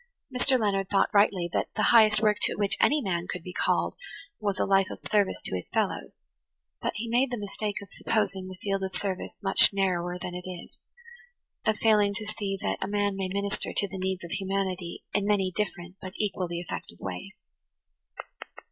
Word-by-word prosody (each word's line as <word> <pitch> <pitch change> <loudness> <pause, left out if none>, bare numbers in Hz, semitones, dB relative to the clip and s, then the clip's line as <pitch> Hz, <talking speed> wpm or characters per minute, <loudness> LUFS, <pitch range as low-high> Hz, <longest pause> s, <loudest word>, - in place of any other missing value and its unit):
Mr. 255 +1 +3
Leonard 195 -3 +1
thought 200 +2 +2
rightly 200 -4 +4
that - - +1
the 215 - +1
highest 215 -1 +6
work 210 -1 +3
to - - +2
which 200 -1 +1
any 295 -1 +4
man 175 -3 -1
could 180 - -4
be 180 - -7
called - - +1 0.5
was 200 -3 -1
a - - +2
life 195 -1 +4
of - - -6
service 205 -2 +2
to - - -2
his 90 - -5
fellows; - - 0 0.7
but - - -1
he 230 +3 -3
made 245 +3 +2
the 245 - -2
mistake 205 0 -3
of 200 - -14
supposing 195 -4 -1
the 185 - -7
field 195 -1 0
of 190 0 -2
service 190 -2 -3
much 195 -1 +7
narrower 180 -2 0
than 180 0 -5
it 180 +1 -6
is–of 470 - -7
failing 210 -2 +4
to 215 0 -4
see 205 -2 -3
that 95 - -1
a - - -1
man 205 -1 +1
may 195 -1 -2
minister 200 +2 -2
to 200 - +1
the 190 0 -7
needs 190 -1 -2
of 170 - -8
humanity 190 -2 -2
in 205 - +2
many 195 -3 +1
different 185 -3 -3
but 185 0 -7
equally 180 -4 -1
effective 165 - -6
ways. 90 -1 -6
195 Hz, 190 wpm, -28 LUFS, 185-210 Hz, 0.7 s, much